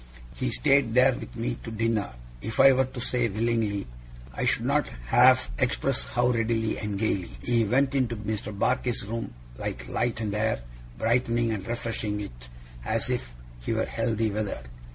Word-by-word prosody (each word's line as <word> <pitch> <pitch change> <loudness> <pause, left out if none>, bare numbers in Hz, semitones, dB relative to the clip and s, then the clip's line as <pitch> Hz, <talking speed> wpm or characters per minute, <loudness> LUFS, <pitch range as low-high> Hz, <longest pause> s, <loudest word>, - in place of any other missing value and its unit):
He 130 - -2
stayed 135 -2 +3
there 130 +1 +6
with - - -8
me 120 +1 -2
to - - -7
dinner 110 - -1 0.3
if 110 +1 -4
I 135 - +9
were 130 +1 +3
to 130 0 -8
say 120 -1 0
willingly, 110 -1 0 0.5
I - - -2
should - - +1
not - - +2 0.2
half 130 - +5
express 130 0 +1
how 120 0 +1
readily 115 -1 0
and 105 -2 -3
gaily. 100 - 0
He 115 -2 +2
went 135 +5 +2
into 125 -4 +1
Mr. 105 0 -4
Barkis's 120 +3 0
room 115 - -4 0.2
like - - -4
light 120 -2 -1
and 105 -3 -2
air, 105 - 0 0.3
brightening 115 0 +1
and 100 -3 -4
refreshing 115 -3 -2
it - - -8 0.3
as - - 0
if 60 -1 -2 0.3
he - - -2
were - - +1
healthy 110 -1 0
weather. 100 - -3
115 Hz, 170 wpm, -27 LUFS, 105-125 Hz, 0.5 s, I